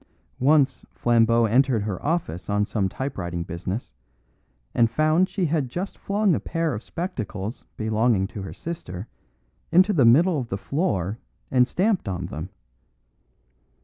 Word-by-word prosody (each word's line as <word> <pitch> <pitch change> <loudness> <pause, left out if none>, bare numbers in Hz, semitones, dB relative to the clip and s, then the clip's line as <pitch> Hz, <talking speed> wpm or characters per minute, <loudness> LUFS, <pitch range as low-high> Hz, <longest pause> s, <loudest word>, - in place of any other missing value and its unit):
Once 140 +1 +3
Flambeau 115 0 +3
entered 120 0 +3
her 100 -3 -4
office 145 - -2
on 105 0 +2
some 100 -3 -1
typewriting 90 -10 -4
business, 90 +6 -5 0.8
and 115 -1 +4
found 155 +8 +2
she 190 -1 -1
had 150 -5 0
just 180 +9 -4
flung 200 -1 +1
a - - +1
pair 165 -3 -1
of 110 - -4
spectacles 115 - -5
belonging 110 -2 +2
to 100 +1 -7
her 95 - -6
sister 105 - -6 0.6
into 185 +5 +5
the 145 -8 +4
middle 150 +8 +5
of 120 -3 -5
the 95 - -2
floor 105 - -1 0.3
and 125 -1 +4
stamped 190 - +1
on 90 -2 -3
them. 85 +1 -6
120 Hz, 145 wpm, -24 LUFS, 100-165 Hz, 0.8 s, into